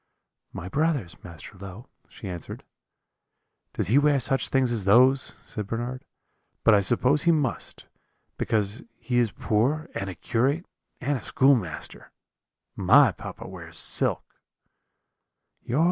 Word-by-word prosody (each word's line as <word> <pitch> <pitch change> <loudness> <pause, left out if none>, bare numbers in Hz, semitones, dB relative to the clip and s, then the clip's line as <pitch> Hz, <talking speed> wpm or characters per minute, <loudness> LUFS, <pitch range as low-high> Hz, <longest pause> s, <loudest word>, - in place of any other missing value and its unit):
"'My 85 - -7
brother's, 140 - -1
Master 85 +3 -11
Low,' 100 +5 -10 0.2
she 100 - -10
answered. 90 -3 -7 1.1
"'Does - - -1
he 130 +6 +5
wear 145 -1 +3
such 135 +2 +1
things 130 -2 +2
as 110 -5 -1
those?' 130 +6 +4
said 105 -2 -6
Bernard; 120 +4 -4 0.6
'but 115 - +6
I 100 - +5
suppose 125 +8 +2
he 170 - +4
must, 150 -6 -2 0.5
because 105 -2 -1 0.2
he 120 +1 -1
is 115 -3 +1
poor, 135 +13 0
and 95 - -4
a 90 - -7
curate, 140 - 0 0.4
and 140 -1 -1
a - - -13
schoolmaster 120 - 0 0.6
my 120 +7 +5
papa - - -9
wears - - -7
silk.' - - +2
120 Hz, 130 wpm, -26 LUFS, 100-135 Hz, 1.1 s, but